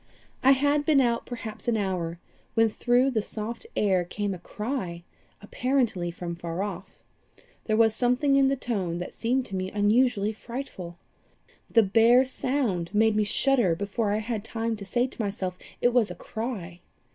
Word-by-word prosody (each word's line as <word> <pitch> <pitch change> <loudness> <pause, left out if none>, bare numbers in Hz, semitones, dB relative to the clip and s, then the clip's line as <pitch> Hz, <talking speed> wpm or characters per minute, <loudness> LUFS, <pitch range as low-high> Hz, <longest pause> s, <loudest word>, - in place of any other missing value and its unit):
"I 265 +1 +7
had 285 +2 +2
been 295 -1 +4
out 235 -3 +1
perhaps 225 -2 -7
an 235 -2 +2
hour, 180 -4 -2 0.4
when 225 -1 +4
through 245 +4 +2
the 220 -4 +1
soft 225 - -6
air 190 -3 +2
came 205 +3 -3
a 180 - -7
cry, 190 -4 -4 0.4
apparently 235 -6 0
from 170 0 -5
far 170 +2 -4
off. 195 -2 -7 0.6
There 215 -1 +1
was 225 -1 +4
something 250 +4 +2
in 275 -1 +5
the 275 - +2
tone 200 -10 -2
that 175 - -6
seemed 250 +2 0
to 195 - -6
me 185 0 -2
unusually 215 +1 +2
frightful. 215 -7 -7 0.7
The 225 - +5
bare 230 +6 +5
sound 255 -10 -1
made 220 0 +4
me 215 - +3
shudder 240 -6 +2
before 205 +3 -1
I 210 - +1
had 215 -1 -3
time 225 0 -2
to 200 - -8
say 240 +5 +1
to 255 - -6
myself 195 -3 -3 0.3
it 245 - +3
was 240 -4 +3
a - - -6
cry. 205 -7 -5
220 Hz, 170 wpm, -27 LUFS, 190-245 Hz, 0.7 s, I